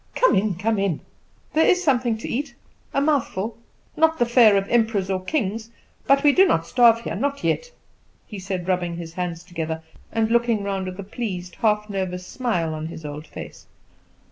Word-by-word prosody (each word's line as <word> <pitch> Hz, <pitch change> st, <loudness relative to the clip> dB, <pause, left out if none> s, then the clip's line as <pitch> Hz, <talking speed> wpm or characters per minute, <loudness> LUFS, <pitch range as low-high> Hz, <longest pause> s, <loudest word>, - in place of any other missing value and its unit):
"Come -, -, +4 dB
in, 195 Hz, -1 st, +1 dB
come 210 Hz, +4 st, 0 dB
in. 195 Hz, -6 st, 0 dB, 0.5 s
There 320 Hz, -, +4 dB
is 360 Hz, 0 st, +3 dB
something 250 Hz, -7 st, +2 dB
to 220 Hz, -, -7 dB
eat 285 Hz, +5 st, -3 dB, 0.4 s
a -, -, +1 dB
mouthful: 245 Hz, -8 st, 0 dB, 0.4 s
not 320 Hz, 0 st, +3 dB
the 240 Hz, -, +3 dB
fare 235 Hz, -4 st, +6 dB
of 195 Hz, 0 st, -1 dB
emperors 220 Hz, -5 st, +1 dB
or 185 Hz, -1 st, -1 dB
kings; 220 Hz, -2 st, -2 dB, 0.4 s
but 275 Hz, 0 st, +4 dB
we 290 Hz, -, +7 dB
do 380 Hz, +6 st, +5 dB
not 165 Hz, -, +1 dB
starve, 230 Hz, +1 st, +4 dB
not 280 Hz, 0 st, -2 dB
yet," -, -, 0 dB, 0.5 s
he 210 Hz, -, -8 dB
said, 185 Hz, -2 st, -4 dB
rubbing 180 Hz, -2 st, 0 dB
his 165 Hz, -1 st, -7 dB
hands 175 Hz, -1 st, -4 dB
together 160 Hz, -3 st, -4 dB, 0.3 s
and 225 Hz, 0 st, 0 dB
looking 235 Hz, -3 st, +2 dB
round 195 Hz, -1 st, -2 dB
with 185 Hz, +1 st, -7 dB
a -, -, -4 dB
pleased, 190 Hz, -4 st, -5 dB
half 210 Hz, -1 st, +1 dB
nervous 185 Hz, -3 st, -3 dB
smile 180 Hz, -12 st, -1 dB
on 155 Hz, 0 st, -4 dB
his 160 Hz, -1 st, -9 dB
old 150 Hz, +1 st, -7 dB
face. -, -, -10 dB
210 Hz, 185 wpm, -23 LUFS, 180-240 Hz, 0.5 s, we